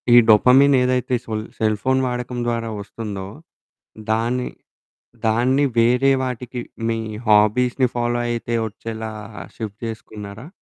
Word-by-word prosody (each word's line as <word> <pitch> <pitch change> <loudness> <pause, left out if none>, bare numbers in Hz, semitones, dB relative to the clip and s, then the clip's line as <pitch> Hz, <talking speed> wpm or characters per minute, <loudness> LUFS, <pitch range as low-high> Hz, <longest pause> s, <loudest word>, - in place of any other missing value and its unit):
ఈ - - +9
డోపమిన్ 130 +6 +6
ఏదైతే 125 0 +1
సొల్ 110 -1 -3
cell 110 -1 +1
phone 130 0 +2
వాడకం 125 0 -3
ద్వారా 115 -1 -1
వస్తుందో, 100 -2 -6 0.9
దాన్ని, 120 +3 0 0.8
దాన్ని 125 +6 +3
వేరే 125 +4 +4
వాటికి 125 -1 -4 0.3
మీ 115 0 0 0.3
హాబీస్‌ని 120 +5 +3
ఫాలో 120 0 0
అయితే 120 0 -2
వచ్చేలా 110 +1 -6 0.5
షిఫ్ట్ 110 -2 -6
చేసుకున్నారా? 110 +1 -8
120 Hz, 115 wpm, -21 LUFS, 110-125 Hz, 0.9 s, ఈ